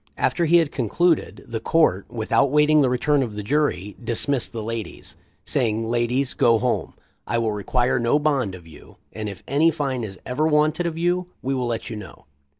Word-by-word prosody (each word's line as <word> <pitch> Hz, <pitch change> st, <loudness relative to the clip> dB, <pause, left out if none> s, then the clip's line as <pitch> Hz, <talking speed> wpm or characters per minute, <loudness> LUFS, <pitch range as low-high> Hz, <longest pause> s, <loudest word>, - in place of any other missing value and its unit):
After 170 Hz, -, +1 dB
he 170 Hz, +2 st, +5 dB
had 165 Hz, -4 st, +2 dB
concluded, 160 Hz, -, 0 dB
the 115 Hz, -1 st, -3 dB
Court, 130 Hz, -, +2 dB
without 115 Hz, +3 st, +1 dB
awaiting 150 Hz, +2 st, +4 dB
the 135 Hz, -, +3 dB
return 135 Hz, +3 st, +2 dB
of 115 Hz, -5 st, -3 dB
the 105 Hz, -, -5 dB
jury, 105 Hz, -7 st, 0 dB
dismissed 120 Hz, +3 st, -1 dB
the 115 Hz, -2 st, -5 dB
ladies, 115 Hz, -1 st, -6 dB, 0.3 s
saying: 115 Hz, -1 st, 0 dB
"Ladies, 120 Hz, +3 st, 0 dB
go 115 Hz, -1 st, +4 dB
home. 125 Hz, +2 st, -1 dB, 0.3 s
I 120 Hz, -, 0 dB
will 115 Hz, -2 st, 0 dB
require 120 Hz, +5 st, 0 dB
no 120 Hz, +4 st, +2 dB
bond 140 Hz, -10 st, 0 dB
of 85 Hz, -2 st, -13 dB
you, 80 Hz, -, -15 dB, 0.2 s
and 105 Hz, -1 st, -4 dB
if 100 Hz, -2 st, -10 dB
any 150 Hz, +5 st, +3 dB
fine 140 Hz, -6 st, -2 dB
is 95 Hz, -3 st, -6 dB
ever 145 Hz, +5 st, 0 dB
wanted 155 Hz, +2 st, +2 dB
of 165 Hz, -1 st, -4 dB
you, 175 Hz, +1 st, 0 dB, 0.2 s
we 135 Hz, +2 st, -1 dB
will 125 Hz, -2 st, -1 dB
let 115 Hz, 0 st, -3 dB
you 110 Hz, -, -5 dB
know." 100 Hz, -9 st, -11 dB
125 Hz, 195 wpm, -23 LUFS, 110-150 Hz, 0.3 s, he